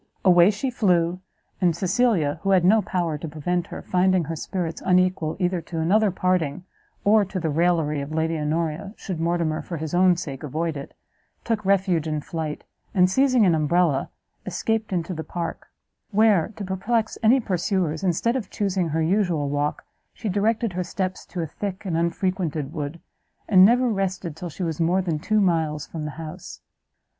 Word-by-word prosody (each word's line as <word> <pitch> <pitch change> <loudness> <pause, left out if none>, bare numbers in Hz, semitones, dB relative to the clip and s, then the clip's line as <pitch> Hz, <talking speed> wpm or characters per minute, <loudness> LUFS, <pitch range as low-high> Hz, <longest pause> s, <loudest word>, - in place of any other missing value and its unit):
Away 175 0 +7
she 215 +6 -2
flew, 180 -6 +1 0.4
and 175 -3 +3
Cecilia, 185 -4 +1
who 195 - -1
had 185 -3 +4
no 215 +4 +5
power 170 -5 -2
to 160 - -5
prevent 170 +3 -2
her, - - -8
finding 185 -1 +2
her 165 +1 -4
spirits 170 0 -4
unequal 180 -3 +2
either 180 -1 0
to 165 +1 -7
another 205 +6 +3
parting, 180 -4 0 0.4
or 210 +1 +5
to 190 0 -4
the 160 -3 -1
raillery 160 -2 +1
of 140 +2 -6
Lady 160 +1 0
Honoria, 160 +6 -2
should 185 -5 -5
Mortimer, 165 -2 0
for 170 - -6
his 155 +1 -5
own 180 0 +4
sake, 140 -7 -6
avoid 155 +2 -2
it, 140 -1 -8 0.5
took 225 -2 -1
refuge 190 -5 +2
in 155 -1 -1
flight, 155 0 -5 0.3
and 185 -1 +4
seizing 255 -1 +4
an 175 - +4
umbrella, 155 -2 +2 0.3
escaped 220 +4 -2
into 180 0 -2
the 160 -1 -5
park; 170 0 -5 0.4
where, 210 -4 +3
to 205 - -6
perplex 215 +4 -1
any 235 +4 +5
pursuers, 180 -6 -1
instead 190 +7 +1
of 225 -7 -3
chusing 190 -4 -1
her 160 +1 0
usual 170 -5 +1
walk, 145 +1 -1 0.3
she 225 - -5
directed 215 +2 0
her 180 +1 -1
steps 185 0 -4
to 180 - -4
a - - -1
thick 195 +5 -6
and 175 -4 -1
unfrequented 170 -3 -1
wood, 150 +1 -4 0.5
and 185 -3 +7
never 245 +5 +5
rested 190 -6 -2
till 175 +2 -6
she 180 - -6
was 165 -1 -2
more 180 +3 +2
than 165 -4 -1
two 215 +6 +1
miles 160 -6 +1
from 155 -2 -6
the - - -3
house. 160 -1 -8
180 Hz, 180 wpm, -24 LUFS, 160-195 Hz, 0.5 s, Away